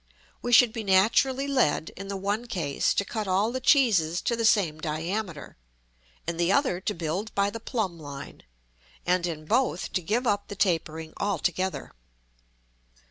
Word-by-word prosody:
We 245 - -3
should 240 -1 +6
be 225 -2 -4
naturally 230 +8 +3
led, 255 - +1
in 195 +1 -8
the 200 0 -4
one 205 +5 -2
case, 160 -11 0
to 200 - +1
cut 215 0 -4
all 195 +5 +2
the 260 - -2
cheeses 205 - +3
to 235 - +1
the 230 0 -1
same 180 -8 +3
diameter; 165 +2 -4 0.7
in 170 0 -3
the 170 +2 +2
other 200 -7 +2
to 210 - -2
build 175 +6 -3
by 200 0 +2
the 230 - -6
plumb 215 -7 -3
line; 140 -2 -9 0.6
and 180 0 +2
in 155 -2 -5
both 235 -1 0
to 185 - 0
give 220 +9 -1
up 205 -3 0
the 205 - -7
tapering 160 -4 -1
altogether. 190 -1 -1
195 Hz, 165 wpm, -27 LUFS, 170-225 Hz, 0.7 s, should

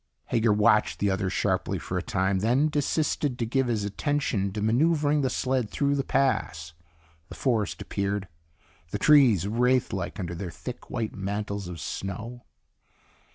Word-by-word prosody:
Hager 115 -1 +3
watched 105 +1 +3
the 100 -1 +1
other 95 0 -1
sharply - - 0
for 90 - -5
a 90 - 0
time, 95 +1 0
then 125 +9 +2
desisted 145 -2 0
to 115 - -1
give 130 +3 0
his 110 -4 0
attention 105 -2 -1
to 105 - -3
maneuvering 145 +7 +2
the 130 - +1
sled 130 -4 -1
through 140 +4 0
the 140 -1 0
pass. 80 - 0 0.6
The - - -9
forest 110 -5 -1
appeared, 100 -1 -2 0.6
the 105 - -2
trees 120 - +5
wraith 125 +3 +2
like 95 +2 -4
under 90 -2 -3
their 85 +1 -5
thick, 125 +8 -8
white 115 -5 -3
mantles 100 0 -3
of 90 -2 -7
snow. 110 +6 -6
110 Hz, 155 wpm, -27 LUFS, 100-130 Hz, 0.6 s, trees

